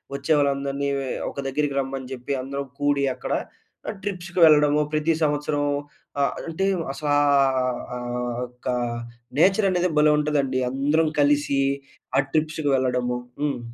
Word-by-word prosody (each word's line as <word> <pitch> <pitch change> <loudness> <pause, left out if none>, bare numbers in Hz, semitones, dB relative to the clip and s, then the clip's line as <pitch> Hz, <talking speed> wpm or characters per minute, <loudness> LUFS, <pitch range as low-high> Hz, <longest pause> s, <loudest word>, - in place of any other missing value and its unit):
వచ్చే 140 +3 -3
వాళ్ళందరిని 140 0 0 0.4
ఒక - - -18
దగ్గరికి 145 +1 -1
రమ్మని 135 -1 -4
జెప్పి, 130 +2 -4
అందరం 140 +1 -4
కూడి 145 -1 +2
అక్కడ - - -4 0.7
ట్రిప్స్‌కి 180 -3 -4
వెళ్ళడము 150 -1 +5
ప్రతి 155 +2 +2
సంవత్సరం 145 0 0 0.6
ఆహ్, 140 - +2 0.2
అంటే 190 +4 -1 0.3
అసలా 145 +1 0 0.5
ఆహ్, 125 -1 -1
ఆ - - -3 0.5
ఒక్క 125 +1 -8 0.7
నేచర్ 195 +4 +4
అనేది 180 0 +1
భలే 150 0 +5
ఉంటదండి. 140 -3 0
అందరం 150 +4 +2
కలిసి 145 -1 +2 0.6
ఆ - - +6
ట్రిప్స్‌కి 155 -1 0
వెళ్ళడము. 125 -1 0 0.2
హ్మ్. 145 -4 0
145 Hz, 125 wpm, -24 LUFS, 135-155 Hz, 0.7 s, ఆ